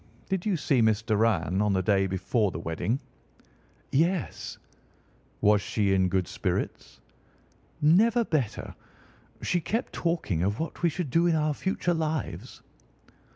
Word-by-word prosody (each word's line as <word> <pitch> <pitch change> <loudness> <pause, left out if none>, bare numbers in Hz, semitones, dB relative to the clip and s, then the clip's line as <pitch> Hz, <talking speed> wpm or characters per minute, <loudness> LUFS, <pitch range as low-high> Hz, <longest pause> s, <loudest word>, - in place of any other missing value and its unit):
Did 190 0 -1
you 195 -4 +1
see 140 -4 +2
Miss 110 -1 +2
Doran 105 -5 +1
on 105 -1 +2
the 95 -1 +1
day 95 0 +2
before 95 +3 0
the 85 - -6
wedding?" 85 +10 -2 0.9
"Yes." 170 +4 0 0.8
"Was 105 0 +4
she 100 -1 0
in 95 -1 +3
good 95 -1 0
spirits?" - - -3 0.8
"Never 220 +10 +4
better. 140 - -2 0.7
She 175 - +1
kept 225 +9 -2
talking 165 - -1
of 100 +4 0
what 160 - -4
we 170 - +3
should 160 -3 -4
do 170 +4 +3
in 170 - +3
our 155 -1 +1
future 180 +2 -1
lives." 155 -7 -3
125 Hz, 140 wpm, -27 LUFS, -, 0.9 s, Was